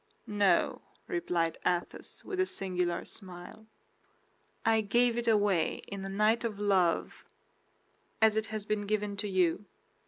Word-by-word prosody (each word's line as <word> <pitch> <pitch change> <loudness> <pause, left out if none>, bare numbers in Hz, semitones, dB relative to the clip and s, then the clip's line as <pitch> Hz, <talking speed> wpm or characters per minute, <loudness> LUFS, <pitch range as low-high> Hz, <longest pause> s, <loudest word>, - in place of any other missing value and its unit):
"No," 205 -3 +2 0.2
replied 175 - -1
Athos, 175 -1 -2
with 380 -2 -4
a 375 - +4
singular 180 - -2
smile. 185 +2 -9 1.0
"I 225 0 +4
gave 235 +3 +2
it 240 0 -2
away 205 -7 +2
in 200 -1 -6
a 195 - -4
night 215 +4 +2
of 215 -3 -3
love, 190 -5 +1 1.0
as 220 -1 +5
it 220 0 0
has 215 -1 -5
been 210 -1 -1
given 210 -1 -1
to 205 +1 -2
you." 185 +1 +1
205 Hz, 135 wpm, -31 LUFS, 185-220 Hz, 1.0 s, as